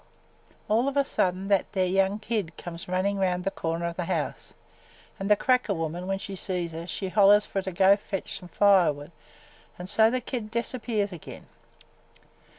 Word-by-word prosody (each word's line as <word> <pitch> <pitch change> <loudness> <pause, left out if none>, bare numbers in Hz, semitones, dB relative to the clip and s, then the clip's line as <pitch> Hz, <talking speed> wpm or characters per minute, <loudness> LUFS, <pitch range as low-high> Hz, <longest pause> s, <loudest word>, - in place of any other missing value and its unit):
All 230 +5 +2
of 280 0 -1
a 280 - +5
sudden 190 -7 -1
that 200 -2 +1
there 190 -2 +2
young 195 +2 +2
kid 215 -6 -3
come 175 -1 -7
runnin' 190 +2 0
around 180 -1 0
the 195 - -1
corner 165 -2 -3
of 170 0 -4
the 175 - -2
house 165 -4 -3 0.6
an' 195 - -3
the 210 - +6
cracker 250 -3 +1
woman, 165 +2 -4
when 195 0 0
she 195 0 -7
sees 180 -3 -3
her, 165 +1 -7
she 190 +1 -4
hollers 205 +1 +5
fer 195 - -3
her - - -4
to 190 - -3
go 190 +2 +5
fetch 200 -1 -5
some 180 - -12
fire 195 -3 +5
wood 145 +2 -10 0.7
an' 180 - -7
so 220 +4 +4
the 255 +2 0
kid 240 -3 -5
disappears 230 -3 -2
again. 175 -4 -10
195 Hz, 190 wpm, -27 LUFS, 180-210 Hz, 0.7 s, the